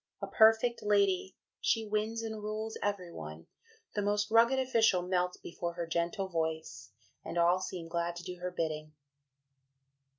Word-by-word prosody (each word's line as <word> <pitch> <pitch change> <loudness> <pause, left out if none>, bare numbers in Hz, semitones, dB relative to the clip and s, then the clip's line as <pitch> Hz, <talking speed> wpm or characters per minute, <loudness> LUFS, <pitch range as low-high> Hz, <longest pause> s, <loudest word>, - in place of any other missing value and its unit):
A - - -3
perfect 225 +2 +4
lady, 200 -2 +2 0.2
she 225 -1 +1
wins 215 +2 -1
and 220 -1 -4
rules 215 +1 -4
every 200 -4 -2
one, 80 - -8 0.5
the 205 - 0
most 205 +1 0
rugged 235 +4 +5
official 225 -8 +3
melts 180 0 0
before 170 0 -5
her 170 - -3
gentle 170 +4 -1
voice, 160 - -3 0.3
and - - -5
all 175 +2 +4
seem 180 -3 -5
glad 170 0 -2
to 175 - -7
do 180 0 -6
her 180 +1 -3
bidding.'" 155 -3 -3
185 Hz, 155 wpm, -32 LUFS, 170-215 Hz, 0.5 s, rugged